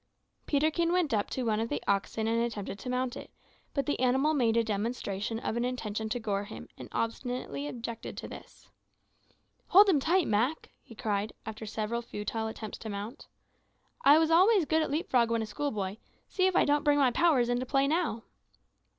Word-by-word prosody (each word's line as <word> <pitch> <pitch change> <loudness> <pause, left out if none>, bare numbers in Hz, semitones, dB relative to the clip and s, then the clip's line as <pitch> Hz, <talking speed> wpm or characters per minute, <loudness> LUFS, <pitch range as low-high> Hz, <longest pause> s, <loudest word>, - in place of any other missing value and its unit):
Peterkin 315 +4 +2
went 355 -7 +1
up 205 -2 0
to 260 - -3
one 220 -2 +1
of 225 +1 -1
the - - -1
oxen 200 +2 0
and 230 +1 +1
attempted 210 -4 -3
to 250 - -6
mount 250 0 -1
it; - - -9 0.5
but 275 - 0
the 290 - -1
animal 265 +5 +3
made 235 -6 +2
a 230 - +4
demonstration 210 -1 -2
of 225 - -3
an 235 - 0
intention 220 -3 -3
to 245 - -1
gore 205 -3 -2
him, - - -9
and - - -10
obstinately 230 - -3
objected 230 +5 -6
to - - -6
this. - - -12 1.0
"Hold 400 +3 +7
him 320 -7 +4
tight, 345 +5 +2
Mak," 235 +9 0
he 230 - -14
cried, 210 0 -2
after 220 0 -6
several 220 +2 -2
futile 220 0 -4
attempts 220 -1 -7
to 220 - -7
mount. 210 +7 -6 0.8
"I 290 +2 +8
was 320 0 +3
always 375 +2 +5
good 320 +2 +2
at 310 - -1
leap 305 +5 -1
frog 235 -3 +3
when 230 -1 +1
a - - -3
schoolboy; 210 -4 -3 0.3
see 370 -1 +2
if 375 - 0
I - - +5
don't 290 +1 +2
bring 290 -1 +4
my 270 -3 +4
powers 290 -6 +3
into 245 +1 -1
play 275 +1 +2
now." 305 -8 0
240 Hz, 195 wpm, -30 LUFS, 220-290 Hz, 1.0 s, I